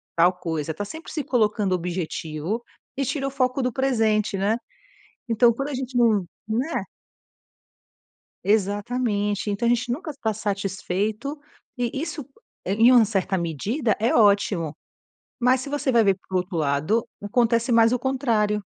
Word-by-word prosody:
tal 170 +2 +5
coisa", 160 -3 -3
tá 205 - -4
sempre 320 +10 -9
se 300 - -2
colocando 210 -6 +1
objetivo, 170 +2 -3 0.3
e 275 - -1
tira 275 +1 -2
o - - -4
foco 260 -1 0
do 250 -1 -1
presente, 220 -6 +1
né. 205 +4 +1 0.7
Então 235 +1 +4
quando 275 +4 -3
a - - -4
gente 255 -1 -4
não 220 -6 +3 0.2
né? 250 +9 -1 1.6
Exatamente, 205 0 0
então 205 +3 -2
a - - +4
gente 240 0 0
nunca 310 +5 -3
tá 220 -3 0
satisfeito, 205 +6 -2 0.4
e 240 -1 0
isso 320 -1 -4 0.4
em 220 +6 +5
uma 245 -2 +7
certa 195 -2 0
medida 205 - -1
é 225 +2 +1
ótimo. 200 -7 +3 0.7
Mas 255 +2 +4
se 265 - -6
você 290 -1 0
vai 230 -3 +4
ver 195 -1 +4
por 190 - 0
outro 180 0 -3
lado, 155 +9 +1 0.2
acontece 230 +3 +1
mais 230 -1 +5
o 250 - +1
contrário, 230 -6 0
220 Hz, 150 wpm, -24 LUFS, 195-250 Hz, 1.6 s, uma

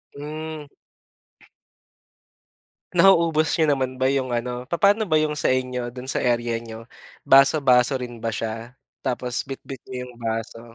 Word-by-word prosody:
Hmm. 155 +1 -6 2.3
Nauubos 170 -4 +4
niyo 160 - +3
naman 130 -1 -2
ba 130 - 0
yung 135 -1 +1
ano 125 +1 -3
Papano 200 +4 +2
ba 155 - +4
yung 155 -1 +1
sa 150 - 0
inyo 125 -1 -1
dun 125 +1 -9
sa 130 - -2
area 120 -1 0
niyo? 115 -1 -10 0.4
Baso-baso 135 -2 +5
rin 120 -2 -8
ba 115 - -1
siya, 115 +3 -5 0.2
tapos 125 -2 -2
bitbit 135 -1 -8
niyo 125 -1 -5
yung 125 - -12
baso? 115 0 -4
130 Hz, 140 wpm, -23 LUFS, 120-150 Hz, 2.3 s, Baso-baso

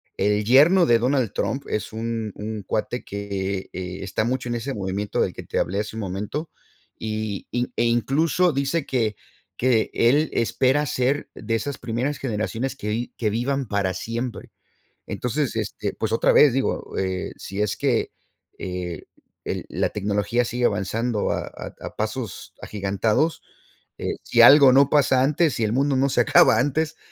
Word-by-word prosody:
el 105 0 +1
yerno 155 - +6
de 120 -4 +5
Donald 125 -2 0
Trump 135 - -2
es 105 0 -3
un 115 -1 -3
un 105 -1 -5
cuate 110 +5 -2
que 100 -1 -4
está 95 +3 -3
mucho 125 +1 -2
en 120 - -2
ese 130 +4 -3
movimiento 100 +1 -3
del - - +1
que - - -8
te - - -2
hablé 100 +3 -1
hace 110 +1 -7
un - - -3
momento. 105 - -4 0.5
Y 110 -2 -4
y 125 0 -2
e - - +1
incluso 150 +8 +2
dice 140 +3 0
que, 110 -5 -1 0.4
que 120 -3 +2
él 145 +7 +3
espera 130 +5 +1
ser 135 +2 0
de 115 - -2
esas 140 +5 -3
primeras 125 +4 -2
generaciones 120 +2 -3
que 105 - -6
vi 115 +3 -2
que 110 -3 0
vivan 130 +4 -1
para 100 -2 0
siempre. 115 +5 -5 0.5
Entonces 125 0 -2
este 105 -2 -3
pues 110 0 -3
otra 115 - +3
vez 145 -4 +7
digo, 135 +2 -2
eh, 95 -1 -2
si 100 +2 -5
es 105 - 0
que, - - 0 0.5
eh, 90 -3 -5 0.4
el - - -3
la - - 0
tecnología 105 +4 0
sigue 120 +1 -1
avanzando 105 +2 0
a - - -2
a - - -9
a - - -8
pasos - - -4
agigantados, 105 - 0 0.6
eh, - - -3
si - - +3
algo 140 -2 +9
no 140 +1 +5
pasa 130 -3 +4
antes, 150 +1 +2
si 115 - -2
el 105 - +1
mundo 135 +2 +1
no 135 +1 +2
se 125 - 0
acaba 115 -1 +5
antes, 155 +4 0
115 Hz, 170 wpm, -23 LUFS, 105-135 Hz, 0.6 s, algo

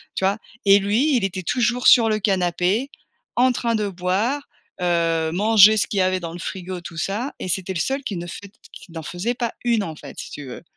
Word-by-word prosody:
tu - - -3
vois? 200 +3 +1 0.3
Et 200 0 +7
lui 230 +9 +2
il 225 - -1
était 185 -1 -4
toujours 245 +4 +1
sur 230 -2 +7
le 215 0 +1
canapé 190 +4 0 0.5
en 255 +1 +4
train 235 -1 -1
de 210 -2 -1
boire, 195 +10 -1 0.4
heu, 165 -2 +1
manger 215 +2 +6
ce 205 - +2
qu'il 200 - -2
y - - +4
avait 185 0 +1
dans 165 -1 -5
le 175 - -8
frigo 185 0 -5
tout 165 -1 -10
ça 220 - -2
et 185 - -5
c'était 190 +1 -1
le 170 - -3
seul 270 - -1
qui 205 - -4
ne 175 - -6
faite 200 +4 -10 0.2
qui 175 - -13
n'en 160 -1 -6
faisait 195 +10 -3
pas 235 -2 -3
une 230 -3 +2
en 160 -4 -6
fait 140 - -11
si - - -8
tu 145 - -8
veux. 125 - -9
195 Hz, 235 wpm, -22 LUFS, 175-230 Hz, 0.5 s, Et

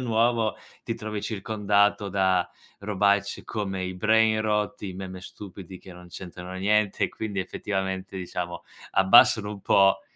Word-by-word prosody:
nuovo, 115 -2 +1 0.3
ti - - -2
trovi 105 -1 -5
circondato 105 -1 +1
da 95 -2 +1 0.3
robacce 100 0 +1
come 95 -3 -4
i 95 0 -4
brainrot, 110 +1 +2
i 100 -2 -4
meme 95 0 -7
stupidi 95 -1 -10
che 95 - -12
non 90 0 -13
c'entrano 90 0 -9
niente, 100 +1 +1
e - - +3
quindi, 105 -3 -4
effettivamente, 95 0 -4
diciamo, 90 -1 -5 0.3
abbassano 105 +1 +6
un 105 -1 -7
po', 95 0 +4
100 Hz, 135 wpm, -26 LUFS, 95-105 Hz, 0.3 s, abbassano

